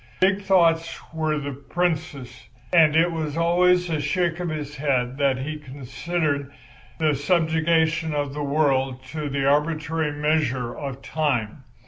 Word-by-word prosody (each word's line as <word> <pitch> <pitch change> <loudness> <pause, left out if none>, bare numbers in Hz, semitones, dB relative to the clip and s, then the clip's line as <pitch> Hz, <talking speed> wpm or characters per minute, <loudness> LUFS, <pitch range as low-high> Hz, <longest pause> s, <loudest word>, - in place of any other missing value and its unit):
Big 190 +2 +3
thoughts 170 -4 +2
were 155 -1 0
the 145 -1 -4
Prince's; 140 -5 -3 0.2
and 160 -3 +6
it 165 +2 +4
was 155 -2 -3
always 180 +1 +3
with 160 -3 -1
a - - -2
shake 170 +3 0
of 175 -1 -2
his 150 -2 -5
head 130 -3 0
that 135 -2 +2
he 150 +4 -5
considered 140 +1 -3 0.5
the 155 -2 +2
subjugation 160 +1 +1
of 145 -2 -2
the 150 - -4
world 135 -3 +1
to 150 +2 -5
the 135 -1 -1
arbitrary 155 +2 +1
measures 145 -5 0
of 135 -2 -6
Time. 135 -6 -1
150 Hz, 145 wpm, -24 LUFS, 140-165 Hz, 0.5 s, and